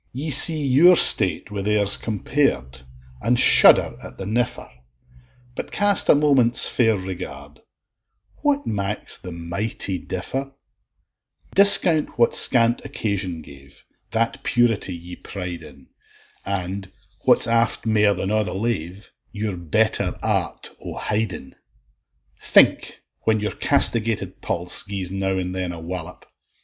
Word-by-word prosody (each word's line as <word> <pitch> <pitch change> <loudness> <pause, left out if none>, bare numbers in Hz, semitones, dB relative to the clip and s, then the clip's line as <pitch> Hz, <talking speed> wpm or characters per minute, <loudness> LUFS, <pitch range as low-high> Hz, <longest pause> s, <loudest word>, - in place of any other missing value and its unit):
Ye 145 +5 -6
see 155 +2 +4
your 155 +8 +4
state 95 - +5
wi' 100 -1 -6
theirs 105 0 -1
compared, 100 - -3 0.4
And 120 +2 0
shudder - - +7
at - - -12
the 95 - -8
niffer; 120 +4 -4 0.9
But - - -8
cast 205 -2 +2
a - - +6
moment's 135 -5 +2
fair 115 -4 0
regard, 85 -6 -10 0.8
What 290 -1 -2
maks 100 0 -4
the 90 - -10
mighty 90 +3 -5
differ; 135 +12 -7 1.0
Discount 185 -7 +6
what 120 -1 +1
scant 120 -1 +5
occasion 95 -6 -5
gave, 70 -1 -18 0.3
That 115 +1 -3
purity 115 -6 -1
ye 85 +1 -12
pride 90 -3 -9
in; 70 -4 -17 0.5
And 95 0 -6 0.3
(what's - - +3
aft 115 0 -1
mair 105 -2 +1
than 95 +2 -5
a' 110 0 0
the 90 - -7
lave), 100 -3 -6 0.2
Your 105 -2 -6
better 85 -3 -2
art - - -3
o' - - -9
hidin. 105 -9 -5 0.9
Think, - - +1 0.2
when 110 -1 0
your 105 0 -4
castigated 115 -1 0
pulse 90 +1 -1
Gies 95 -3 -7
now 95 0 -3
and 90 0 -5
then 95 -1 -5
a 85 - -9
wallop! 85 0 -9
100 Hz, 130 wpm, -20 LUFS, 90-115 Hz, 1.0 s, shudder